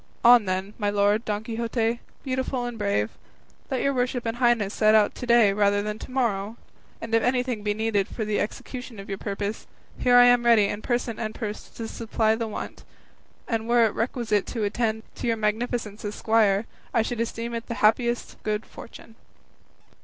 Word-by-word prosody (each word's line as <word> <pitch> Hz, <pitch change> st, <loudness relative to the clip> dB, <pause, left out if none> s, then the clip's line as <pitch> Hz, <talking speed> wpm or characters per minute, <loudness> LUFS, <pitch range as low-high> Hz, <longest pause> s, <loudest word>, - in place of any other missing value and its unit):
On, 240 Hz, -2 st, +8 dB
then, 190 Hz, +2 st, -2 dB
my 205 Hz, -1 st, +1 dB
lord 205 Hz, +2 st, +2 dB
Don 210 Hz, 0 st, -2 dB
Quixote, 230 Hz, 0 st, -1 dB, 0.2 s
beautiful 260 Hz, -2 st, -2 dB
and 240 Hz, -1 st, -4 dB
brave, 200 Hz, -, 0 dB, 0.6 s
let 265 Hz, -, -1 dB
your 275 Hz, -, +2 dB
worship 250 Hz, -2 st, -1 dB
and 225 Hz, +1 st, -2 dB
highness 240 Hz, -5 st, +2 dB
set 215 Hz, 0 st, +4 dB
out 215 Hz, -1 st, +4 dB
to 245 Hz, -, -7 dB
day 235 Hz, -4 st, +5 dB
rather 205 Hz, 0 st, +2 dB
than 210 Hz, +1 st, -4 dB
to -, -, -9 dB
morrow; 230 Hz, -4 st, -1 dB, 0.4 s
and 230 Hz, 0 st, -7 dB
if 230 Hz, -, +4 dB
anything 250 Hz, -2 st, 0 dB
be 205 Hz, 0 st, -1 dB
needed 220 Hz, -3 st, 0 dB
for 220 Hz, -, -4 dB
the 210 Hz, 0 st, 0 dB
execution 245 Hz, +1 st, -5 dB
of 195 Hz, -, -9 dB
your 195 Hz, -1 st, -4 dB
purpose, 200 Hz, +1 st, -4 dB, 0.3 s
here 245 Hz, 0 st, +4 dB
am 245 Hz, 0 st, +6 dB
I 240 Hz, -, +3 dB
ready 220 Hz, -3 st, +6 dB
in 205 Hz, -, -4 dB
person 240 Hz, -2 st, -2 dB
and 215 Hz, -1 st, -4 dB
purse 215 Hz, -2 st, -5 dB
to 230 Hz, -, -7 dB
supply 220 Hz, -1 st, 0 dB
the 225 Hz, 0 st, -2 dB
want; 215 Hz, -, -7 dB, 0.6 s
and 225 Hz, 0 st, -2 dB
were 240 Hz, -1 st, +5 dB
it 215 Hz, -, 0 dB
requisite 230 Hz, -3 st, -1 dB
to 230 Hz, -3 st, -3 dB
attend 220 Hz, +1 st, -1 dB, 0.2 s
your 230 Hz, -2 st, 0 dB
magnificence 220 Hz, 0 st, -2 dB
as 205 Hz, 0 st, -4 dB
squire, 220 Hz, -2 st, +2 dB, 0.3 s
I 230 Hz, -, +4 dB
should 235 Hz, 0 st, -4 dB
esteem 230 Hz, 0 st, -3 dB
it 230 Hz, 0 st, -5 dB
the 235 Hz, -, -4 dB
happiest 235 Hz, +3 st, +1 dB
good 215 Hz, 0 st, -2 dB
fortune." 230 Hz, -, -12 dB
225 Hz, 190 wpm, -25 LUFS, 210-240 Hz, 0.6 s, On